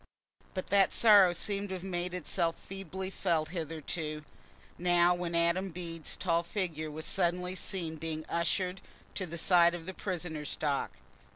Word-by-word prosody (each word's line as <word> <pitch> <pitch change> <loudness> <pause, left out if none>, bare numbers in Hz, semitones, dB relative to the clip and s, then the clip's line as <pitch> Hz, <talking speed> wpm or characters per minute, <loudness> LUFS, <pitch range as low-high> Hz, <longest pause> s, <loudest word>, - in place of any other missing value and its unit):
But 185 - -2
that 200 -1 +4
sorrow 205 -5 +7
seemed 200 +3 -2
to 190 - -3
have 185 - -7
made 180 -1 -3
it 180 - -5
itself 170 -3 +1
feebly 190 0 -6
felt 160 -4 0
hitherto, 155 -2 -4 0.5
now 175 0 +4
when 175 -1 -3
Adam 170 +3 +2
Bede's 165 -2 -4
tall 170 -2 +1
figure 170 -4 -3
was 155 +1 -6
suddenly 180 -1 +1
seen 175 -4 -3
being 155 0 -4
ushered 180 +2 -1 0.3
to 185 - -3
the 170 +1 -6
side 170 0 +5
of 165 -2 -8
the 190 - -5
prisoner's 175 -6 -4
dock. 145 -2 0
175 Hz, 160 wpm, -31 LUFS, 165-185 Hz, 0.5 s, sorrow